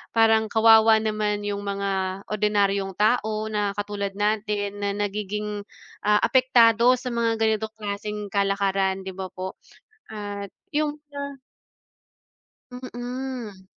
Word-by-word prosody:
Parang 225 -1 +5
kawawa 220 0 +6
naman 210 -1 -1
yung 205 0 -2
mga 195 -1 -2
ordinaryong 200 -2 +1
tao 215 0 +1
na 205 -1 0
katulad 205 -1 -3
natin 205 -1 -1
na 200 0 0
nagiging, 210 0 -3 0.4
ah, 210 0 +5
apektado 240 -2 +5
sa 250 0 -5
mga 230 -1 +1
ganitong 220 0 +1
klaseng 210 0 -4
kalakaran, 195 -1 +1
'di 190 - -5
ba 190 -1 -5
po? 185 +1 -6 0.6
At 205 -1 -5 0.3
yung 300 0 0
sa 280 0 -5 1.4
Mm. 245 -5 -6
210 Hz, 115 wpm, -24 LUFS, 200-225 Hz, 1.4 s, kawawa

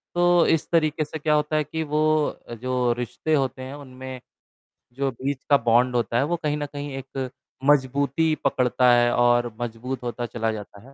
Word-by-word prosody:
तो 175 0 +4
इस 160 -2 +2
तरीके 155 -2 +2
से 155 +1 -7
क्या 150 +1 +1
होता 150 +1 +1
है 155 - +2
कि 160 +2 -4
वो 150 0 -2 0.6
जो 125 -1 +1
रिश्ते 125 +6 -2
होते 135 -3 0
हैं 130 +2 -7
उनमें 130 -2 -9 0.7
जो 135 +1 -1
बीच 135 +2 -4
का 140 - +7
बॉन्ड 120 +2 +4
होता 120 0 0
है 135 - +3
वो 175 +3 0
कहीं 150 0 0
न 145 - -3
कहीं 145 -1 -5
एक 135 -1 -5 0.4
मजबूती 140 +3 +2
पकड़ता 125 -2 +3
है 120 0 +4
और 120 -1 +3
मजबूत 120 +2 -4
होता 120 0 -3
चला 115 -1 -2
जाता 105 -1 -8
है। - - -18
130 Hz, 185 wpm, -24 LUFS, 120-150 Hz, 0.7 s, का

